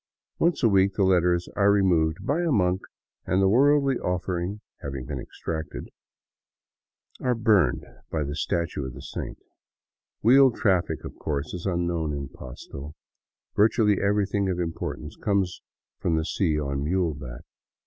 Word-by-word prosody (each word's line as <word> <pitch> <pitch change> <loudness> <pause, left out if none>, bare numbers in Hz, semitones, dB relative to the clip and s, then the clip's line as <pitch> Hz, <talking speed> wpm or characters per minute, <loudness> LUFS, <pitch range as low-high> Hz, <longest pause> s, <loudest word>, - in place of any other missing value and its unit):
Once 170 -4 +2
a - - +7
week 100 -2 +3
the 100 - +2
letters 90 -2 +3
are 100 0 +4
removed 85 -6 +2
by 150 +5 +1
a 170 -2 +1
monk 95 -5 +2 0.5
and, 95 - +2
the 95 - +4
worldly 140 +4 +4
offering 90 +2 -2 0.2
having 70 -2 -5
been 65 0 -4
extracted, 80 +3 -6 1.3
are 125 -1 +1
burned 105 -8 +3 0.3
before 80 -2 -1
the 70 +1 -4
statue 85 -1 -1
of 65 -2 -6
the - - -9
saint. - - -6 0.9
Wheeled 130 +2 +6
traffic, 95 -5 +1
of - - -8
course, 75 0 -3
is 90 +1 -4
unknown 85 -4 -1
in 70 -2 -4
Pasto; 70 +3 -9 0.6
virtually 105 -1 +3
everything 100 -1 +1
of 90 -1 -1
importance 80 -2 -4
comes 100 -3 -1
up - - -58
from 80 - +1
the 80 0 0
sea 80 -5 0
on 70 -1 -2
muleback. 75 -8 -2
90 Hz, 150 wpm, -26 LUFS, 80-100 Hz, 1.3 s, a